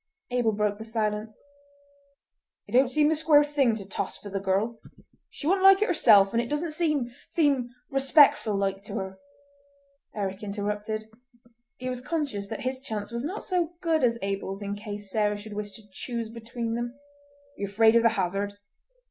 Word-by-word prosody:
Abel 245 -3 +2
broke 205 0 0
the - - -5
silence: 215 -1 -2 1.3
"It - - -13
don't 255 +1 +5
seem 300 +2 +3
the 320 - +2
square 300 -1 +5
thing 285 -6 +2
to 200 -3 -8
toss - - -4
for 205 - -10
the 195 - -1
girl! 200 +4 0 0.5
She - - -9
wouldn't 380 +4 +2
like 390 +1 +8
it - - 0
herself, 210 - +5
and 230 - +3
it 240 - -4
doesn't 300 +3 -1
seem—seem 290 -3 0 0.2
respectful 270 -5 +5
like 195 0 -1
to 200 - -6
her—" 190 -2 -5 1.0
Eric 195 -2 -3
interrupted. 210 +1 -3 0.7
He 255 - -6
was 250 -1 -3
conscious 270 -9 -2
that 220 - -5
his 260 +1 -3
chance 220 -6 -4
was 235 +1 -3
not 370 +9 -4
so 350 -3 -1
good 330 -5 +1
as 235 -1 +3
Abel's 195 0 -3
in 200 0 -3
case 205 -1 -7
Sarah 210 -1 +1
should 205 +1 -9
wish 205 0 -4
to 220 - -12
choose 230 +2 -4
between 230 0 -4
them: 240 +1 -3
"Are 285 0 -29
ye 200 - -1
afraid 220 +3 +4
of 235 - +6
the 230 - +5
hazard?" 200 +1 -1
230 Hz, 180 wpm, -27 LUFS, 205-285 Hz, 1.3 s, like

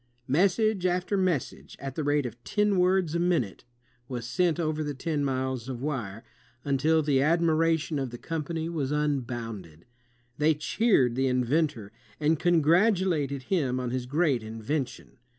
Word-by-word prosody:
Message 195 - +2
after 180 +2 0
message, 185 - -2
at 135 -1 -5
the 155 - -3
rate 145 -1 +1
of 120 0 -7
ten 210 - +1
words 180 -3 +2
a 170 - 0
minute, 170 - 0 0.4
was 120 -2 -5
sent 175 +5 +1
over 155 -1 -1
the 145 -1 -4
ten 150 +1 -2
miles 130 -2 -2
of 125 -2 -4
wire, 120 -7 -4 0.4
until 150 +3 +2
the 140 -2 +2
admiration 160 -1 +2
of 135 -2 -2
the 120 - -8
company 160 +3 -4
was 150 -5 -2
unbounded. 120 - -3 0.5
They 155 +1 +3
cheered 150 - +2
the 130 +2 +1
in 125 -1 +1
ventor 125 -7 0 0.3
and 155 0 +2
congratulated 170 - +2
him 135 -7 0
on 125 -1 -3
his 125 -1 -3
great 145 -3 +1
invention. 115 +4 -5
150 Hz, 150 wpm, -27 LUFS, 130-170 Hz, 0.5 s, They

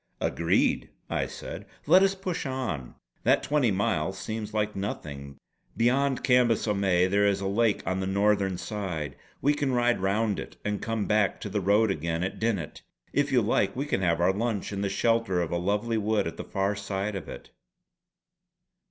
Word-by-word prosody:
"Agreed!" - - +1 0.2
I - - 0
said - - -8 0.2
"let 185 - +7
us 195 0 +3
push 185 -5 -3
on! 125 - -4 0.3
That - - +3
twenty 145 -3 +2
miles 95 -2 0
seems 105 +2 -4
like 105 -1 -1
nothing. 70 -8 -5 0.4
Beyond 130 +3 +2
Cambus 125 -4 +3
o 105 - +2
May 95 -3 +3
there 100 +2 +3
is 100 -1 +1
a 100 - -4
lake 105 +2 +1
on 95 0 -1
the 95 - -2
northern 100 -1 +2
side; 90 -10 -4 0.3
we 145 +2 +4
can 145 -3 -1
ride 120 -2 +2
round 100 +2 +1
it - - -8
and 105 -1 -1
come 115 -2 -1
back 105 -2 +2
to 105 - -4
the 105 +1 -1
road 100 +3 +3
again 85 0 -2
at 95 - -4
Dinnet. 100 -9 -2 0.3
If - - +1
you - - +4
like - - +1
we 135 +3 -2
can 120 -9 -1
have 85 -3 +2
our 90 +2 +3
lunch 105 -1 -2
in 100 - -3
the 100 - 0
shelter 115 -2 +1
of 85 -2 -1
a 85 - 0
lovely 105 +5 0
wood 105 -1 +1
at 80 - -4
the - - -5
far 100 +1 -1
side 100 +1 -3
of 95 - -6
it." - - -10
100 Hz, 190 wpm, -27 LUFS, 95-115 Hz, 0.4 s, let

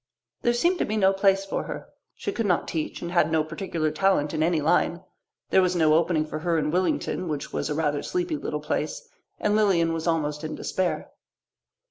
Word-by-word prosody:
There 240 - +3
seemed 345 +8 +2
to - - +2
be 215 - -2
no 195 -2 +4
place 195 0 +3
for 195 - -2
her. - - -6 0.3
She - - -3
could 230 -3 -1
not 180 - +1
teach 160 +1 -3
and 170 - -4
had 170 -3 +3
no 160 -1 +3
particular 160 -1 -2
talent 155 -3 +1
in 155 - -1
any 165 0 +2
line. 170 +3 +1 0.5
There 190 - +6
was 180 -1 +1
no 160 -3 +4
opening 160 -1 +2
for 155 0 -5
her 170 +1 0
in 150 -1 0
Willington, 185 0 0
which 150 -3 -4
was - - -2
a 150 - -1
rather 150 -2 0
sleepy 355 -3 -2
little - - -4
place, - - -3 0.3
and 210 0 +1
Lilian 180 -6 +3
was 165 0 -3
almost 150 -2 0
in 155 0 -4
despair. 185 -1 -2
170 Hz, 205 wpm, -26 LUFS, 155-195 Hz, 0.5 s, There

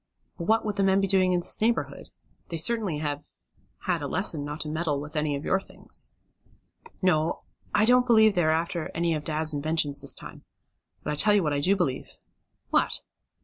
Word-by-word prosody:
But 170 - -4
what 225 0 +3
would 210 -1 -2
the 195 - +2
men 195 0 +4
be 195 - +2
doing 185 -1 +3
in 180 -1 +1
this - - -1
neighborhood? 230 +2 -1 0.4
They 165 - -3
certainly 205 -2 +2
have 145 -1 -3 0.6
had - - -1
a - - -3
lesson 150 -3 -1
not 145 +2 -5
to - - -2
meddle 155 -2 -1
with 150 +2 -8
any 150 -1 0
of 140 - -6
your 190 - +2
things." - - -4 0.9
"No, 165 -3 +1 0.3
I 210 - +4
don't 250 +1 +4
believe 220 -3 +6
they 175 -4 +2
are - - +3
after 165 +1 -1
any 170 0 +1
of 155 -1 -3
dad's 155 0 0
inventions 145 -1 0
this - - 0
time. - - -10 0.6
But - - -2
I - - -2
tell 210 +5 +4
you 200 - +3
what 150 -2 0
I 140 - 0
do 185 +7 +3
believe." 160 -9 -2 0.5
"What?" - - +1
170 Hz, 205 wpm, -27 LUFS, 150-195 Hz, 0.9 s, believe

